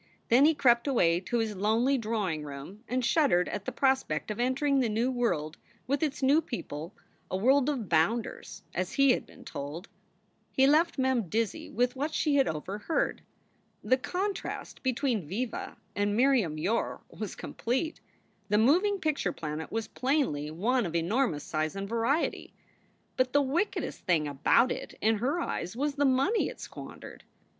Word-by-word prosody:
Then 255 +5 +6
he 315 +1 +4
crept 240 -2 +4
away 175 -11 +3
to 220 +6 -2
his 220 -2 -1
lonely 225 +7 +2
drawing 210 - -1
room 145 - -9
and 255 0 0
shud 305 +3 +3
dered 175 0 +3
at 205 -1 -4
the - - -2
prospect 260 - 0
of 210 - -5
entering 270 +3 +2
the 245 -3 +1
new 230 +4 +1
world 175 -11 -1 0.3
with 280 +1 0
its 295 -3 -1
new 285 +5 +5
people, 185 - -6 0.3
a 185 - -1
world 265 +7 +4
of 255 -8 -2
bounders, 170 +8 0
as 185 +1 -2
he 275 -1 +5
had - - -1
been - - -16
told. 145 +5 -6 0.6
He 265 - +4
left 305 +5 +3
Mem 260 -7 +1
dizzy 225 +2 -1
with 245 +3 0
what 295 +4 -2
she 300 - +1
had 270 - +4
overheard. 195 - -2 0.6
The 255 - +4
contrast 380 +8 -4
between 255 - 0
Viva 225 +8 -4 0.2
and 205 +1 0
Miriam 240 - +3
Yore 195 +9 -1
was - - -6
complete. 260 +7 -3 0.5
The 210 - +3
moving 355 - +4
picture 305 - 0
planet 155 -1 -5
was 225 -1 -2
plainly 255 - 0
one 220 +8 0
of 170 - -6
enormous 170 - +1
size 155 +2 -2
and 195 0 -4
variety. 235 +8 -1 0.6
But 255 -1 +1
the 285 - +5
wickedest 325 +10 -1
thing 160 -4 +2
about 230 - +3
it - - -6
in 220 0 +2
her 275 +9 0
eyes 180 - -3
was 285 +3 -1
the 285 0 +1
money 275 - +2
it - - -10
squandered. - - -10
235 Hz, 165 wpm, -29 LUFS, 185-275 Hz, 0.6 s, Then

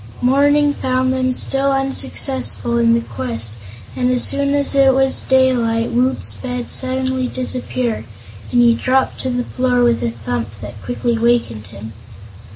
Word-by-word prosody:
Morning 285 +3 +3
found 255 -1 -1
them 255 0 0
still 275 +2 0
unsuccessful 270 -2 -1
in 230 0 +3
the 235 - 0
quest 115 - -5 0.4
and 250 0 0
as 250 -1 +4
soon 280 0 +3
as 285 0 +2
it 270 -1 +4
was 270 0 +2
daylight 240 -3 +1
Woot's 255 +2 0
bed 250 -1 -6
suddenly 260 0 +1
disappeared, 250 - -3 0.5
and 245 - +3
he 235 -1 +5
dropped 260 +3 0
to 260 - -3
the 245 0 -1
floor 250 0 0
with 240 -1 +2
a 120 - -1
thump 115 -2 -5
that 105 0 -9
quickly 240 -1 -2
wakened 230 - 0
him. 110 +4 -10
250 Hz, 155 wpm, -17 LUFS, 230-260 Hz, 0.5 s, he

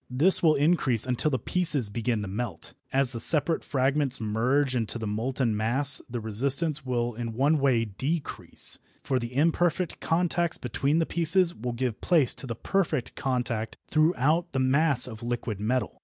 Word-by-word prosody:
This 150 +10 +6
will 155 -3 +4
increase 140 -7 +3
until 125 +4 0
the 130 - 0
pieces 150 -7 +1
begin 115 +1 -2
to - - -5
melt. 115 +1 -5 0.2
As 135 -2 +2
the 115 - -4
separate 160 +6 +2
fragments 135 0 +2
merge 125 +5 0
into 115 -1 -2
the 110 - -5
molten 115 +2 -1
mass 130 +6 +2
the 120 0 -4
resistance 135 +8 0
will 120 -2 -2
in 115 0 -5
one 145 +6 +2
way 130 -5 +2
decrease, 135 - -3 0.2
for 130 -2 0
the 120 +1 -7
imperfect 170 +3 0
contacts 170 0 0
between 135 +5 -1
the 165 - +1
pieces 170 +2 +1
will 120 +2 -5
give 120 -2 -3
place 155 -9 +3
to 135 - -9
the 115 - -4
perfect 155 - -2
contact 120 -4 -3
throughout 160 +2 +1
the - - -2
mass 140 +1 +2
of 110 -4 -9
liquid 120 -3 -4
metal. 110 -2 -2
130 Hz, 170 wpm, -26 LUFS, 115-155 Hz, 0.2 s, This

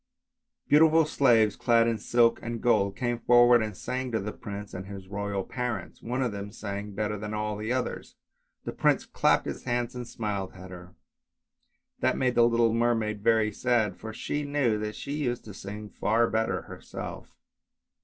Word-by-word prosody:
Beautiful 160 +2 +6
slaves 115 -8 +3
clad 115 -1 +3
in 115 -2 0
silks 120 +2 +3
and 115 0 -4
gold 100 -5 +2
came 120 -2 -1
forward 120 0 +6
and 105 -3 -4
sang 130 0 -3
to 110 - 0
the 105 +2 -4
prince 105 0 -8
and 95 +1 -6
his 100 -2 -9
royal 100 0 -3
parents; 120 -7 -4
one 125 +3 -2
of 125 - -1
them 100 0 -6
sang 100 -1 -6
better 105 0 -2
than 105 +1 -4
all 105 0 -2
the 110 +3 -4
others, 130 0 -3 0.5
and - - -4
the - - -22
prince - - +2
clapped - - +2
his - - -6
hands 120 -1 -1
and 125 -1 -6
smiled 100 -5 -4
at 95 0 -11
her; 90 0 -11 1.0
that - - +1
made 130 -1 +1
the 120 -1 +5
little 115 -1 +3
mermaid 115 -3 0
very 110 -1 +3
sad, 110 -3 +1
for 110 +3 -8
she 145 +6 -3
knew 140 -7 +1
that 105 0 -4
she 140 - -6
used 135 -5 -2
to 105 - -9
sing 105 +2 -7
far 115 +3 +1
better 110 0 -1
herself. - - -8
110 Hz, 185 wpm, -28 LUFS, 105-120 Hz, 1.0 s, Beautiful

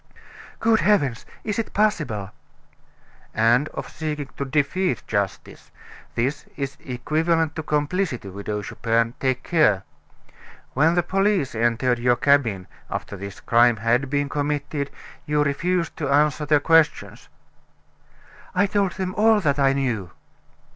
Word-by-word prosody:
"Good 225 -1 +3
heavens! 145 - +1 0.2
Is 210 0 -2
it 225 - -4
possible?" 150 - 0 1.0
"And 120 +6 +3
of - - -6
seeking 150 -3 -5
to 140 - -2
defeat 150 +7 0
justice. 100 -3 -3 0.5
This 135 +5 -1
is 140 -1 -4
equivalent 160 +5 0
to 160 - -3
complicity, 150 - -1
Widow 100 +2 -4
Chupin; 115 +2 0
take 130 -1 0
care. 130 - +3 0.9
When 160 +5 +3
the 175 - +2
police 195 -6 +1
entered 120 +2 +1
your 120 0 +3
cabin, 120 -8 +2 0.2
after - - -5
this 100 +1 -8
crime 120 0 +4
had 120 +5 +1
been 145 0 0
committed, 145 0 -2 0.4
you 150 0 +2
refused 170 +5 -1
to 145 -3 -2
answer 150 +1 +2
their 150 0 +4
questions." 165 +1 +2 1.3
"I 190 +3 +4
told 200 -2 0
them 185 -1 -3
all 220 +1 +4
that 145 -4 +1
I 135 -1 +4
knew." 120 -9 -2
145 Hz, 130 wpm, -23 LUFS, 120-165 Hz, 1.3 s, crime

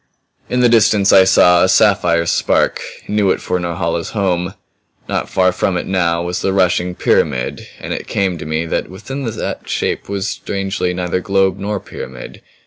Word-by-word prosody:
In 125 - +1
the 125 - +5
distance 105 -3 +4
I 95 - +7
saw 90 -2 +5
a - - +3
sapphire 85 -1 +3
spark; - - +1 0.3
knew 105 -2 +1
it - - +1
for 90 - -2
Norhala's 85 -1 -3
home. 90 -1 -1 0.5
Not - - -2
far 95 -1 +2
from 90 0 -1
it - - -3
now 85 -3 0
was 90 +1 -3
the 95 - 0
rushing 90 -1 +1
pyramid 65 -8 0
and - - -5
it - - -6
came 95 -4 -1
to - - -7
me 80 +1 -1
that 80 - -2
within 135 +9 -6
that 115 - -5
shape - - -2
was 100 -1 -2
strangely 95 -2 -3
neither 90 0 -1
globe 95 0 +1
nor 105 +1 -2
pyramid. 65 -7 -9
95 Hz, 175 wpm, -17 LUFS, 85-100 Hz, 0.5 s, I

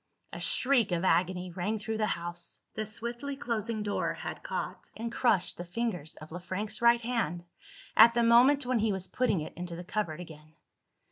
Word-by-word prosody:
A - - -5
shriek 250 -7 +2
of 170 0 0
agony 180 0 +1
rang 190 +5 -2
through 220 +1 -4
the 215 - +2
house. 175 0 -7
The 215 -1 -3
swiftly 235 +6 -4
closing 230 -4 -2
door 205 -1 -1
had - - -6
caught, - - -5
and 230 +1 -4
crushed, 210 -7 +2
the 175 - -5
fingers 180 -4 -3
of 155 +1 -12
Le 175 - -5
Frank's 205 +5 -4
right 235 0 +5
hand, 225 -8 -1 0.5
at 230 +1 +8
the 235 - +3
moment 250 +4 +6
when 250 -1 +1
he 215 0 +2
was 190 -2 -2
putting 245 -9 +1
it 155 - -7
into 175 0 -5
the 175 - -7
cupboard 180 -4 -2
again. 155 -2 -11
215 Hz, 190 wpm, -30 LUFS, 175-235 Hz, 0.5 s, at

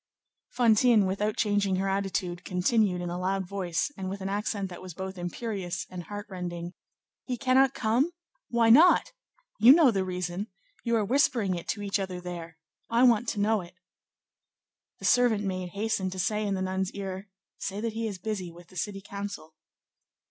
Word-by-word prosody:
Fantine, 230 -2 +4
without 205 +3 -1
changing 205 -2 +1
her 190 +1 0
attitude, 195 -2 -2
continued 185 0 +1
in 175 -1 -3
a 175 - -3
loud 190 +1 -1
voice, 185 - -2
and 190 -2 -4
with 195 +1 -5
an 190 0 -4
accent 205 0 -2
that 175 - -9
was 185 -3 -9
both 190 +1 -5
imperious 185 +1 -4
and 180 -2 -7
heart 205 +2 -6
rending:— 175 -2 -5 0.5
"He 250 -2 -2
cannot 265 +1 +3
come? 240 +7 +2 0.4
Why 230 -1 +4
not? 320 +10 +6 0.5
You 235 +5 +9
know 305 -5 +6
the 195 -3 0
reason. 180 +2 -3 0.4
You 235 -1 +1
are 215 -2 +2
whispering 235 -5 +2
it 170 -1 -5
to 205 - -2
each 200 0 0
other 185 -2 -4
there. 170 -2 -7 0.3
I 235 +2 +3
want 240 -2 +4
to 215 - -2
know 215 0 +2
it." 175 +1 -13 1.2
The - - -8
servant 240 -4 +4
maid 185 -2 -3
hastened 200 -3 -1
to 190 - -6
say 210 +3 0
in 200 - 0
the 190 - -2
nun's 190 0 -1
ear, 195 0 -6 0.3
"Say 200 +1 -4
that 225 0 -2
he 225 0 -2
is 200 -3 -5
busy 185 -2 -4
with 175 0 -15
the 185 - -12
city 195 +2 -3
council." 200 -5 -6
195 Hz, 185 wpm, -28 LUFS, 185-220 Hz, 1.2 s, You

